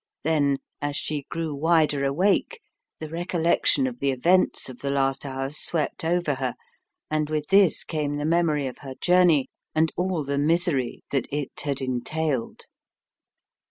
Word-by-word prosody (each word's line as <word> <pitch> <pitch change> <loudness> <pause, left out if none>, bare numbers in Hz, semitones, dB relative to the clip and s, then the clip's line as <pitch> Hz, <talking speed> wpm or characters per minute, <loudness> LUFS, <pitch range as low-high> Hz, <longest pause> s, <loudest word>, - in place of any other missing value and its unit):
Then 145 -4 +2 0.2
as 145 0 -2
she 145 -2 -3
grew 165 -2 -3
wider 155 -1 +2
awake, 190 - +1 0.4
the 155 - -6
recollection 165 -3 +1
of 125 -1 -4
the 140 - +1
events 170 +8 +2
of 130 -2 -9
the 140 - -3
last 135 0 0
hours 135 +2 -3
swept 160 -2 -2
over 170 -2 +1
her, 130 -2 -3 0.6
and 155 -1 0
with 155 -1 -2
this 195 -3 +5
came 150 -2 -2
the 145 - -2
memory 160 -3 +2
of 130 - -6
her 135 -2 -8
journey, 175 -6 +4 0.3
and 160 0 +3
all 180 -3 -1
the 140 0 -1
misery 155 -4 +1
that 135 -4 0
it 145 -1 -3
had 140 -2 -2
entailed. 130 +1 -2
150 Hz, 155 wpm, -25 LUFS, 140-165 Hz, 0.6 s, this